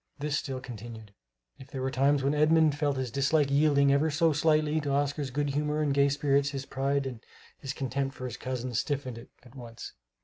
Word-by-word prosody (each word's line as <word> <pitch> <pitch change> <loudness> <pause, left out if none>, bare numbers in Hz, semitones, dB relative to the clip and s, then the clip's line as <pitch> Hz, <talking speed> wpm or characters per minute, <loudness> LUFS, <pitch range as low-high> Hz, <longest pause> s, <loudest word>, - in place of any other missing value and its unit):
This 145 0 -2
still 135 -3 -3
continued. 115 -4 -10 0.5
If 135 - -12
there 135 -2 -5
were 130 - -1
times 135 +2 +2
when 140 +2 +2
Edmund 155 0 +4
felt 145 -2 0
his 130 -3 -3
dislike 140 +2 +2
yielding 140 -1 +4
ever 150 +3 +2
so 160 +2 +2
slightly 155 0 +2
to 145 - -3
Oscar's 140 0 0
good 145 +2 -1
humor 150 +2 0
and 145 -2 +1
gay 140 0 +4
spirits, 140 0 +1
his 135 -1 -5
pride 140 +1 -1
and 125 -3 -6 0.4
his 135 - -5
contempt 135 0 -3
for 130 - -7
his 120 -3 -5
cousin 130 -1 -4
stiffened 130 -1 -2
it 115 - -14
at 125 - -17
once. 120 -3 -9
140 Hz, 205 wpm, -29 LUFS, 130-145 Hz, 0.5 s, Edmund